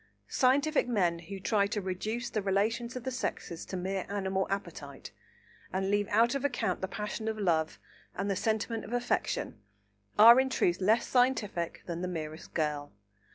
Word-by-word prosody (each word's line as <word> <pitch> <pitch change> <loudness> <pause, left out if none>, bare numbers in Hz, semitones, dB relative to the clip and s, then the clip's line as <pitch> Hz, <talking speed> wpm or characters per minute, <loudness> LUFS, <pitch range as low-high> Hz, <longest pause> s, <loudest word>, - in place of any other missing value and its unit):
Scientific 280 +3 +3
men 180 -8 +1
who 190 +4 -8
try 200 +1 +2
to 210 +1 -2
reduce 210 +5 -3
the 215 - -1
relations 220 +5 0
of 250 - -5
the 260 - -3
sexes 175 -8 -4
to 190 - -4
mere 190 +1 -3
animal 190 -1 -1
appetite, 165 -8 -5 0.6
and 190 +1 -1
leave 205 0 +2
out 230 +4 +3
of 275 -1 -2
account 250 -9 -1
the 190 - -1
passion 210 +2 -4
of 220 -1 -1
love 165 -6 +1 0.4
and 195 - -2
the 200 - 0
sentiment 220 +2 -1
of 235 - -7
affection 245 - -1 0.6
are 235 +4 +10
in 265 0 +2
truth 180 -7 +1
less 220 +5 +3
scientific 230 -9 0
than 170 -1 -4
the 180 - -2
merest 155 -3 -6
girl. 150 -2 -1
200 Hz, 170 wpm, -30 LUFS, 180-235 Hz, 0.6 s, are